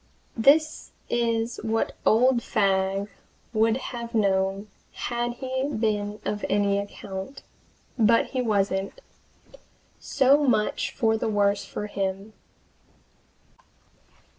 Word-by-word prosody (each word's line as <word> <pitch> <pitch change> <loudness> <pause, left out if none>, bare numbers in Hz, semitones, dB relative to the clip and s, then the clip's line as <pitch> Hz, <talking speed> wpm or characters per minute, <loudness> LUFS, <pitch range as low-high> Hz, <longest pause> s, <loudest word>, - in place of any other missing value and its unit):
This 310 +7 +3 0.2
is 230 -1 0
what 225 0 -1
old 245 +2 +4
Fagg 195 -1 0 0.5
would 220 +1 +2 0.2
have 235 0 -6
known 195 -1 +1 0.3
had 240 0 -2
he 260 +2 -3
been 210 -3 -1
of 210 0 -3
any 200 0 +2
account. 200 +4 -7 0.6
But 230 +1 +4
he 255 - -1
wasn't. 200 - -1 1.0
So 275 +2 +3
much 235 -6 0
the 220 -2 +1
worse 205 -1 +1
for 210 - -5
him. 195 +1 -4
220 Hz, 95 wpm, -25 LUFS, 200-240 Hz, 1.0 s, old